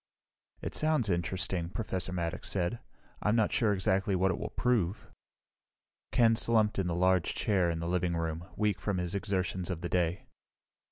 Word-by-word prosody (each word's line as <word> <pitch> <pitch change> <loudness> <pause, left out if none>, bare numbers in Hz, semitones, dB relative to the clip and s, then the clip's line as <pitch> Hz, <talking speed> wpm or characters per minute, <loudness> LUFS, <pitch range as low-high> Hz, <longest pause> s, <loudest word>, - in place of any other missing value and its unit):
"It - - -4
sounds 155 -10 +1
interesting," 85 0 -1
Professor 95 -3 -3
Maddox 85 -2 -3
said. 95 +4 -1 0.4
"I'm 105 +1 +2
not 110 -3 +2
sure 110 -4 +2
exactly 95 0 +1
what 95 +1 +2
it - - -3
will - - -4
prove." 110 -6 0 1.0
Ken 115 -2 +5
slumped 110 -3 +3
in 95 - 0
the 85 - -1
large 90 0 +2
chair 95 -5 +2
in 85 - -1
the 85 - -3
living 90 -1 0
room, 80 0 -2
weak 105 -3 +1
after 100 - -2
his 90 -1 -2
exertions 95 -3 -2
of 90 -3 -3
the 85 - -3
day. 90 +1 0
95 Hz, 170 wpm, -31 LUFS, 85-105 Hz, 1.0 s, Ken